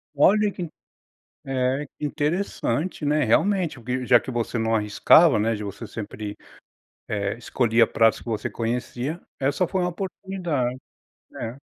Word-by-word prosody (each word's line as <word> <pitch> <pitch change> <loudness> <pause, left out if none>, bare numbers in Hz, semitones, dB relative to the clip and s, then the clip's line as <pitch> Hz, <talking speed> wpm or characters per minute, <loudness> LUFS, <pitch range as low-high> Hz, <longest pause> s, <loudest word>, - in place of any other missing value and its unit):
Olha 205 +8 +4
que 185 - -8
in 170 - -4 0.8
é, 135 +2 0
interessante, 150 0 -1
né. 150 0 +2
Realmente 170 - +2
o 120 - -15
que 125 +1 -2
já 125 -1 +6
que - - -7
você 120 -1 -2
não 115 0 +1
arriscava, 110 +9 +5
né, 115 +2 +1
de 105 - -5
você 100 +3 -6
sempre, 105 0 -6 0.7
eh, 100 0 -1
escolhia 115 -1 +3
pratos 115 0 +3
que - - -16
você 110 -3 -2
conhecia, 125 +6 -3 0.2
essa 140 +7 +1
foi 190 +2 -1
uma 180 - +1
oportunidade. 175 -9 -3 0.6
É. 115 +3 -5
130 Hz, 150 wpm, -24 LUFS, 115-165 Hz, 0.8 s, já